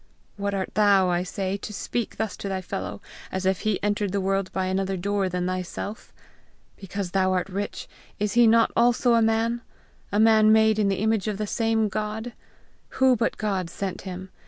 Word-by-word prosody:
Who 200 Hz, -, -5 dB
art 195 Hz, -2 st, -2 dB
thou, 200 Hz, -2 st, +4 dB
I 175 Hz, 0 st, +1 dB
say, 190 Hz, +1 st, -3 dB
to 200 Hz, -, -7 dB
speak 225 Hz, +2 st, -3 dB
thus 220 Hz, -1 st, -2 dB
to 200 Hz, -, -5 dB
thy 190 Hz, -1 st, -2 dB
fellow, 185 Hz, -, -5 dB, 0.3 s
as 190 Hz, 0 st, -3 dB
if 190 Hz, -2 st, +2 dB
he 215 Hz, -3 st, 0 dB
entered 205 Hz, -1 st, 0 dB
the 200 Hz, -, 0 dB
world 195 Hz, 0 st, -1 dB
by 190 Hz, -1 st, -1 dB
another 190 Hz, +1 st, -1 dB
door 200 Hz, +1 st, 0 dB
than 180 Hz, 0 st, -2 dB
thyself! 185 Hz, +3 st, -5 dB, 0.6 s
Because 195 Hz, -1 st, -5 dB
thou 185 Hz, 0 st, +2 dB
art 180 Hz, -1 st, 0 dB
rich, 200 Hz, +2 st, -4 dB, 0.3 s
is 205 Hz, -1 st, -1 dB
he 240 Hz, -1 st, +6 dB
not 230 Hz, +1 st, +4 dB
also 240 Hz, +1 st, +3 dB
a 230 Hz, -, +4 dB
man? 225 Hz, +1 st, +1 dB, 0.5 s
a 205 Hz, -, +1 dB
man 220 Hz, -1 st, +6 dB
made 220 Hz, 0 st, +4 dB
in 205 Hz, -, +3 dB
the 195 Hz, -1 st, 0 dB
image 220 Hz, -1 st, +1 dB
of 210 Hz, -2 st, -2 dB
the 215 Hz, -, -2 dB
same 225 Hz, 0 st, +1 dB
God? 215 Hz, +3 st, -4 dB, 0.6 s
Who 260 Hz, -1 st, +5 dB
but 235 Hz, 0 st, -1 dB
God 195 Hz, -5 st, -2 dB
sent 190 Hz, +1 st, -4 dB
him? 185 Hz, 0 st, -7 dB
200 Hz, 195 wpm, -25 LUFS, 190-220 Hz, 0.6 s, he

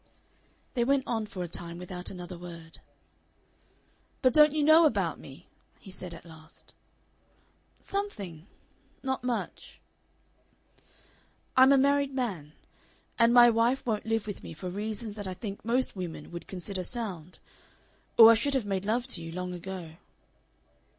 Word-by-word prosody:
They 240 Hz, -, +1 dB
went 275 Hz, +2 st, +2 dB
on 225 Hz, -2 st, -2 dB
for 185 Hz, -3 st, -5 dB
a -, -, -4 dB
time 170 Hz, 0 st, -5 dB
without 180 Hz, 0 st, -5 dB
another 180 Hz, -1 st, -8 dB
word. 170 Hz, -2 st, -11 dB, 1.4 s
"But 255 Hz, -2 st, +5 dB
don't 300 Hz, 0 st, +7 dB
you 300 Hz, 0 st, 0 dB
know 315 Hz, +2 st, +7 dB
about 195 Hz, -, -1 dB
me?" 140 Hz, +6 st, -13 dB, 0.3 s
he 195 Hz, -, -13 dB
said 180 Hz, -2 st, -6 dB
at 170 Hz, -, -14 dB
last. 160 Hz, 0 st, -15 dB, 1.1 s
"Something. 200 Hz, -, -5 dB, 0.6 s
Not 265 Hz, -1 st, -2 dB
much." 245 Hz, -2 st, -4 dB, 1.8 s
"I'm 260 Hz, +1 st, +7 dB
a 275 Hz, -, +6 dB
married 280 Hz, 0 st, +2 dB
man. 185 Hz, -, -3 dB, 0.7 s
And 230 Hz, 0 st, +5 dB
my 240 Hz, 0 st, +8 dB
wife 235 Hz, +4 st, +1 dB
won't 220 Hz, -2 st, -2 dB
live 225 Hz, -1 st, 0 dB
with 205 Hz, -2 st, -6 dB
me 165 Hz, -, -9 dB
for 180 Hz, +3 st, -6 dB
reasons 210 Hz, +2 st, -5 dB
that 205 Hz, -2 st, -5 dB
I 185 Hz, -, -4 dB
think 200 Hz, 0 st, -7 dB
most 245 Hz, +3 st, +1 dB
women 170 Hz, -5 st, -6 dB
would 170 Hz, 0 st, -8 dB
consider 190 Hz, +1 st, -4 dB
sound.... 185 Hz, -6 st, -4 dB, 0.8 s
Or 225 Hz, 0 st, +11 dB
I -, -, +7 dB
should 275 Hz, +5 st, +1 dB
have 255 Hz, -5 st, 0 dB
made 195 Hz, -1 st, -2 dB
love 235 Hz, +4 st, 0 dB
to 225 Hz, -10 st, -2 dB
you 165 Hz, 0 st, -7 dB
long 180 Hz, +1 st, -4 dB
ago." 175 Hz, -2 st, -7 dB
205 Hz, 150 wpm, -29 LUFS, 175-245 Hz, 1.8 s, Or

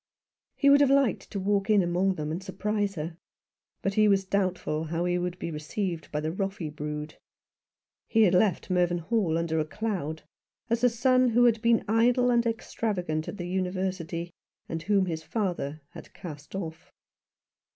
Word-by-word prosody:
He 280 Hz, -1 st, +4 dB
would 285 Hz, 0 st, +7 dB
have 280 Hz, -, +5 dB
liked 275 Hz, -3 st, +2 dB
to 200 Hz, -, -4 dB
walk 200 Hz, +1 st, 0 dB
in 205 Hz, -3 st, +5 dB
among 180 Hz, +2 st, +1 dB
them 150 Hz, -2 st, -3 dB
and 170 Hz, +4 st, -3 dB
surprise 205 Hz, +1 st, -2 dB
her; 160 Hz, +1 st, -5 dB, 0.7 s
but 195 Hz, -, 0 dB
he 215 Hz, +1 st, +4 dB
was 195 Hz, -1 st, +3 dB
doubtful 185 Hz, -5 st, -1 dB
how 165 Hz, +2 st, -2 dB
he 180 Hz, 0 st, +1 dB
would 180 Hz, 0 st, -3 dB
be 170 Hz, -, -4 dB
received 165 Hz, +3 st, -4 dB
by 150 Hz, -, -1 dB
the 155 Hz, +1 st, -2 dB
Roffey 195 Hz, -3 st, -3 dB
brood. 150 Hz, 0 st, -5 dB, 0.9 s
He 225 Hz, -1 st, +4 dB
had 190 Hz, -3 st, +4 dB
left 185 Hz, 0 st, +2 dB
Mervynhall 175 Hz, +1 st, +1 dB
under 165 Hz, -1 st, 0 dB
a -, -, +2 dB
cloud, 175 Hz, -5 st, -3 dB, 0.5 s
as 235 Hz, +1 st, +1 dB
a 250 Hz, -, +6 dB
son 255 Hz, +2 st, +3 dB
who 240 Hz, +1 st, +4 dB
had 225 Hz, -2 st, +3 dB
been 235 Hz, -1 st, +3 dB
idle 245 Hz, +3 st, +3 dB
and 235 Hz, -1 st, +3 dB
extravagant 185 Hz, -8 st, -2 dB
at -, -, -6 dB
the 175 Hz, -, -5 dB
University, 180 Hz, -2 st, -2 dB, 0.4 s
and 165 Hz, 0 st, -4 dB
whom 195 Hz, +3 st, +2 dB
his 160 Hz, -3 st, -3 dB
father 160 Hz, -4 st, -3 dB
had -, -, -13 dB
cast 150 Hz, -3 st, -9 dB
off. 160 Hz, -4 st, -6 dB
185 Hz, 170 wpm, -28 LUFS, 165-215 Hz, 0.9 s, would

